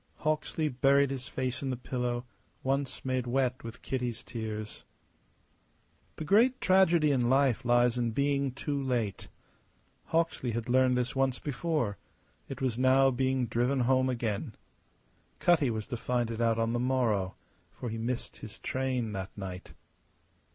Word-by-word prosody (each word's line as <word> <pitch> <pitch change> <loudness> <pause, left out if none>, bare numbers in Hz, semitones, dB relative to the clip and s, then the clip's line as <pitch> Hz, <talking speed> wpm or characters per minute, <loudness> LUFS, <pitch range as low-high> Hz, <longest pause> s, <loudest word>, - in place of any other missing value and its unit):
Hawksley 155 0 -1
buried 140 +1 +3
his 130 -1 -5
face 130 -3 -3
in 135 - -2
the 130 - -2
pillow 125 0 -3 0.4
once 135 0 -2
made 130 -1 -1
wet 130 0 0
with 115 0 -9
Kitty's 125 -3 -3
tears. 110 -2 -6 1.3
The - - -5
great 230 - +4
tragedy 175 -5 +4
in 125 -3 +2
life 135 -2 +3
lies 120 0 +3
in 120 -1 +1
being 140 +2 0
too 140 +2 -3
late. 120 -7 -2 0.8
Hawksley 160 -7 0
had 115 +1 -3
learned 130 0 +3
this 125 +1 -1
once 135 -1 +1
before; 145 -6 -2 0.5
it - - -6
was 125 -3 -1
now 135 +1 +5
being 130 0 +1
driven 120 +4 +1
home 130 +1 +3
again. 115 -1 -2 0.8
Cutty 160 -7 +3
was 110 -2 -3
to 120 - -5
find 120 0 -1
it 115 0 -4
out 115 -1 +2
on 115 0 0
the 120 - 0
morrow, 120 -7 +1 0.4
for 120 - -6
he 115 - -4
missed 120 +2 -3
his 110 - -10
train 130 -4 -2
that 95 -1 -4
night. 95 -2 -7
125 Hz, 150 wpm, -30 LUFS, 115-135 Hz, 1.3 s, now